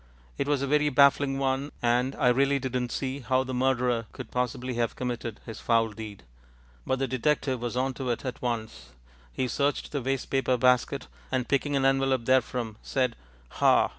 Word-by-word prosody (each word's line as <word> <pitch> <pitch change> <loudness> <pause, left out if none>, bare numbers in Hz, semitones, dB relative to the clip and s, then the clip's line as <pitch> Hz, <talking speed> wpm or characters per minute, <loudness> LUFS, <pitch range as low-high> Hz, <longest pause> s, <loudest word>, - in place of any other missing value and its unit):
It 140 - -2
was 145 -2 +1
a - - -1
very 150 +1 +3
baffling 140 0 +4
one, 135 +1 -1
and 125 +2 +1
I 125 - +3
really 140 +3 +3
didn't 125 -2 -2
see 135 0 -3
how 130 0 +1
the 130 0 -5
murderer 125 -3 +1
could - - -8
possibly 125 0 -2
have 115 -1 -1
committed 120 -3 -4
his 110 -2 -7
foul 115 -1 +2
deed. 105 -2 -9 0.6
But 130 - +1
the 135 0 -1
detective 130 0 0
was 120 0 -3
on 130 +1 0
to 130 -1 -4
it 120 +3 -2
at 130 - -4
once. 110 - -4 0.4
He 130 - -1
searched 140 +4 -1
the 145 - -2
wastepaper 135 0 0
basket, 125 +2 +2 0.3
and, 130 -1 0
picking 140 +1 +1
an 135 -1 +2
envelope 135 -2 +2
therefrom, 125 -3 +1
said 130 -3 0 0.4
"Ha!" - - +5
130 Hz, 180 wpm, -27 LUFS, 120-135 Hz, 0.6 s, Ha